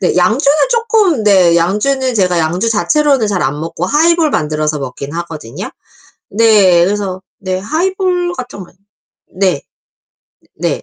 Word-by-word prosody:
네. 180 Hz, -, 0 dB
양주는 260 Hz, -, +2 dB
쪼끔 435 Hz, -, +1 dB
네, 185 Hz, -5 st, +4 dB
양주는 250 Hz, +9 st, 0 dB
제가 180 Hz, -5 st, +1 dB
양주 175 Hz, +8 st, 0 dB
자체로는 275 Hz, +2 st, +1 dB
잘 195 Hz, -5 st, -1 dB
안 145 Hz, +1 st, -2 dB
먹고 165 Hz, +2 st, -4 dB
하이볼 320 Hz, -, +2 dB
만들어서 155 Hz, -, -1 dB
먹긴 140 Hz, +1 st, -7 dB
하거든요. 165 Hz, -8 st, -7 dB, 0.6 s
네. 200 Hz, -5 st, +4 dB
그래서 195 Hz, -1 st, -3 dB, 0.2 s
네. 185 Hz, -1 st, -3 dB
하이볼 355 Hz, -, -1 dB
같은 245 Hz, -4 st, -7 dB
거 -, -, -15 dB, 0.7 s
네. 185 Hz, -6 st, 0 dB, 1.0 s
네. -, -, -2 dB
200 Hz, 265 characters per minute, -14 LUFS, 170-285 Hz, 1.0 s, 네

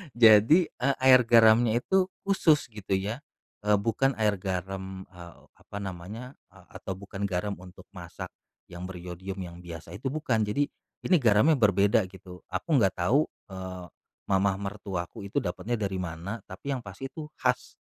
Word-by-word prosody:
Jadi, 115 Hz, -, +7 dB
eee, 135 Hz, +2 st, 0 dB
air 130 Hz, -1 st, +8 dB
garamnya 115 Hz, 0 st, +6 dB
itu 190 Hz, -1 st, +2 dB, 0.2 s
khusus, 160 Hz, -9 st, +3 dB
gitu 105 Hz, -3 st, -5 dB
ya, 105 Hz, +5 st, -3 dB, 0.5 s
eee, 105 Hz, -1 st, +4 dB
bukan 125 Hz, +6 st, +1 dB
air 105 Hz, -2 st, +3 dB
garam, 95 Hz, 0 st, -5 dB
eee, 85 Hz, -2 st, -12 dB, 0.2 s
apa 100 Hz, -, -10 dB
namanya, 100 Hz, +8 st, -7 dB, 0.2 s
eee, -, -, -18 dB
atau 95 Hz, -, -5 dB
bukan 100 Hz, 0 st, -7 dB
garam 100 Hz, +1 st, -1 dB
untuk 90 Hz, 0 st, -13 dB
masak, -, -, -8 dB, 0.4 s
yang 90 Hz, +1 st, -7 dB
beryodium, 90 Hz, +1 st, -7 dB
yang 85 Hz, -1 st, -8 dB
biasa 85 Hz, -3 st, -9 dB
itu 125 Hz, +6 st, -4 dB
bukan. 125 Hz, -7 st, 0 dB
Jadi, 140 Hz, +8 st, 0 dB, 0.4 s
ini 180 Hz, -, +5 dB
garamnya 120 Hz, +5 st, +4 dB
berbeda, 100 Hz, -1 st, +3 dB
gitu. 90 Hz, -2 st, -12 dB
Aku -, -, -4 dB
nggak 95 Hz, -5 st, +3 dB
tahu, 135 Hz, -, +3 dB, 0.2 s
eee, 95 Hz, -1 st, -7 dB, 0.4 s
mama 95 Hz, 0 st, +3 dB
mertuaku 100 Hz, 0 st, -5 dB
itu -, -, 0 dB
dapatnya 100 Hz, +7 st, -2 dB
dari 95 Hz, -2 st, -2 dB
mana, 90 Hz, +5 st, -5 dB
tapi 105 Hz, +9 st, -6 dB
yang 130 Hz, -, -1 dB
pasti 100 Hz, +8 st, -7 dB
itu 155 Hz, +2 st, -7 dB
khas, -, -, 0 dB
100 Hz, 160 wpm, -28 LUFS, 95-120 Hz, 0.5 s, air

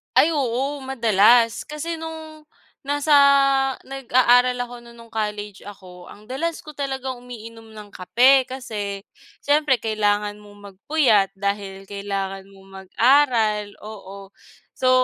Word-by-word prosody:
Ay, 330 Hz, -, +5 dB
oo, 275 Hz, 0 st, -2 dB
madalas. 230 Hz, -2 st, +3 dB
Kasi 320 Hz, +3 st, -5 dB
nong, 315 Hz, -1 st, -9 dB, 0.4 s
nasa 290 Hz, +1 st, -1 dB, 0.7 s
nag-aaral 250 Hz, -1 st, +2 dB
ako 245 Hz, 0 st, -10 dB
non 235 Hz, 0 st, -16 dB
no'ng 230 Hz, -1 st, -16 dB
college 210 Hz, -2 st, -4 dB
ako, 180 Hz, -3 st, -12 dB
ang 210 Hz, -, -14 dB
dalas 275 Hz, +8 st, -4 dB
ko 305 Hz, -, -10 dB
talagang 265 Hz, -3 st, -5 dB
umiinom 225 Hz, -2 st, -12 dB
ng 210 Hz, -1 st, -11 dB
kape. 255 Hz, +8 st, +3 dB
Kasi, 210 Hz, -6 st, -6 dB, 0.4 s
siyempre 290 Hz, -1 st, +3 dB
kailangan 210 Hz, -1 st, -1 dB
mong 205 Hz, -1 st, -14 dB
magpuyat 215 Hz, -2 st, +2 dB
dahil 200 Hz, 0 st, -4 dB
kailangan 195 Hz, -1 st, -5 dB
mong 195 Hz, -1 st, -18 dB, 0.2 s
mag-aral. 230 Hz, -2 st, +2 dB, 0.2 s
Oo. 200 Hz, -2 st, -11 dB, 0.4 s
So, 255 Hz, -, 0 dB
230 Hz, 120 wpm, -22 LUFS, 205-265 Hz, 0.7 s, Ay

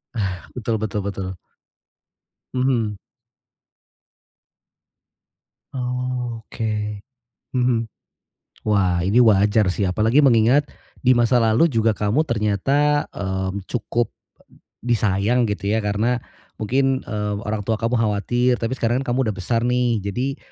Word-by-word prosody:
Ah, 95 Hz, -5 st, -2 dB
betul 115 Hz, -2 st, -1 dB
betul 105 Hz, -1 st, -2 dB
betul. 95 Hz, -2 st, -4 dB, 1.2 s
Mhm. 120 Hz, -5 st, 0 dB, 2.8 s
Oh, 125 Hz, -2 st, -3 dB
oke, 105 Hz, -2 st, -3 dB, 0.5 s
mhm. 125 Hz, -3 st, 0 dB, 0.7 s
Wah, 95 Hz, -4 st, +2 dB
ini 100 Hz, +6 st, +3 dB
wajar 105 Hz, -2 st, +4 dB
sih, 95 Hz, +3 st, -1 dB
apalagi 110 Hz, +9 st, +3 dB
mengingat 125 Hz, +2 st, +5 dB, 0.4 s
di 130 Hz, -, +5 dB
masa 120 Hz, 0 st, +3 dB
lalu 115 Hz, +7 st, +4 dB
juga, 115 Hz, -5 st, +2 dB
kamu 105 Hz, +8 st, +1 dB
ternyata, 135 Hz, +5 st, +1 dB
mmm, 95 Hz, 0 st, -3 dB
cukup 120 Hz, -1 st, -1 dB, 0.7 s
disayang 115 Hz, 0 st, +1 dB
gitu 100 Hz, -1 st, -4 dB
ya, 110 Hz, -, 0 dB
karena 110 Hz, +4 st, 0 dB, 0.3 s
mungkin, 130 Hz, +4 st, 0 dB
eee, 105 Hz, -1 st, -3 dB
orang 105 Hz, -1 st, -3 dB
tua 115 Hz, -, +1 dB
kamu 115 Hz, +2 st, 0 dB
khawatir. 115 Hz, +3 st, +1 dB
Tapi 115 Hz, -1 st, -3 dB
sekarang 120 Hz, +3 st, +1 dB
kamu 125 Hz, 0 st, 0 dB
udah 110 Hz, -, -1 dB
besar 115 Hz, +6 st, -1 dB
nih, 125 Hz, -2 st, +1 dB
jadi, 125 Hz, +8 st, -3 dB
115 Hz, 115 wpm, -22 LUFS, 105-125 Hz, 2.8 s, mengingat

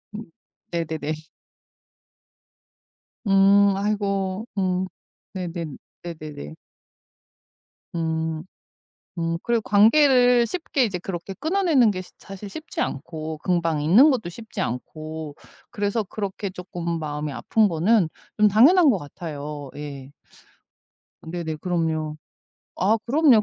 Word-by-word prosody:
음. 220 Hz, +1 st, -6 dB, 0.5 s
네네네. 160 Hz, -2 st, -2 dB, 2.1 s
음 195 Hz, +1 st, +6 dB
아이고. 200 Hz, 0 st, -1 dB
음. 185 Hz, -1 st, +1 dB, 0.5 s
네네. 170 Hz, -5 st, -4 dB, 0.3 s
네네네. 155 Hz, -, -7 dB, 1.4 s
음. 160 Hz, -1 st, -1 dB, 0.8 s
음 165 Hz, 0 st, 0 dB
그리고 235 Hz, -1 st, +1 dB
관계를 245 Hz, +2 st, +5 dB
쉽게 300 Hz, -6 st, 0 dB
이제 195 Hz, -4 st, -2 dB
그렇게 180 Hz, +1 st, -6 dB
끊어내는 315 Hz, -, +3 dB
게 185 Hz, -, -4 dB
시 185 Hz, -, -13 dB
사실 195 Hz, +1 st, -9 dB
쉽지 315 Hz, +10 st, -5 dB
않고 155 Hz, +2 st, -4 dB
금방 165 Hz, -4 st, +1 dB
잊는 220 Hz, -, +7 dB
것도 230 Hz, -10 st, 0 dB
쉽지 220 Hz, +5 st, -9 dB
않고 155 Hz, +4 st, -4 dB, 0.3 s
그래서 205 Hz, 0 st, -1 dB
그렇게 200 Hz, 0 st, -4 dB
쪼끔 175 Hz, -2 st, -4 dB
마음이 150 Hz, -1 st, -3 dB
아픈 220 Hz, +10 st, +2 dB
거는 180 Hz, +1 st, +3 dB, 0.3 s
좀 210 Hz, -, +6 dB
당연한 285 Hz, -, +6 dB
것 225 Hz, -, +3 dB
같아요. 145 Hz, -2 st, -7 dB
예. 140 Hz, -2 st, -8 dB, 1.1 s
네네 160 Hz, -1 st, -4 dB
그럼요. 160 Hz, -3 st, -1 dB, 0.6 s
아 205 Hz, +5 st, +3 dB
그럼요, 270 Hz, -4 st, +5 dB
185 Hz, 215 characters per minute, -24 LUFS, 160-215 Hz, 2.1 s, 잊는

